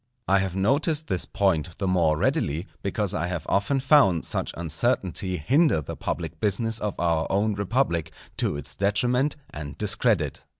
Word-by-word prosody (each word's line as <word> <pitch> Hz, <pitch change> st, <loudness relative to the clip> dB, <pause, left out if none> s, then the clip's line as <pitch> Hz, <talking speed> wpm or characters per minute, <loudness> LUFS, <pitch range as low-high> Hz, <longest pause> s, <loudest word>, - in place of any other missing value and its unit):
I 100 Hz, 0 st, +4 dB
have 95 Hz, -2 st, -2 dB
noticed 145 Hz, +10 st, +1 dB
this 95 Hz, -, 0 dB
point 85 Hz, -4 st, 0 dB
the 95 Hz, -, -2 dB
more 85 Hz, -4 st, +2 dB
readily, 75 Hz, +2 st, 0 dB, 0.2 s
because 100 Hz, -1 st, 0 dB
I 85 Hz, -, -1 dB
have 90 Hz, -3 st, -4 dB
often 120 Hz, +8 st, +1 dB
found 130 Hz, -, +4 dB
such -, -, -1 dB
uncertainty 90 Hz, +1 st, -1 dB
hinder 135 Hz, -, +3 dB
the 75 Hz, -, -6 dB
public -, -, -4 dB
business 110 Hz, +2 st, 0 dB
of 105 Hz, -2 st, -4 dB
our 80 Hz, -2 st, +1 dB
own 105 Hz, +2 st, +1 dB
republic, 100 Hz, -, -1 dB, 0.3 s
to 75 Hz, -, -1 dB
its 75 Hz, -, -7 dB
detriment 125 Hz, +8 st, +1 dB, 0.2 s
and 70 Hz, -2 st, -7 dB
discredit. 105 Hz, -, +1 dB
100 Hz, 160 wpm, -25 LUFS, 85-115 Hz, 0.3 s, I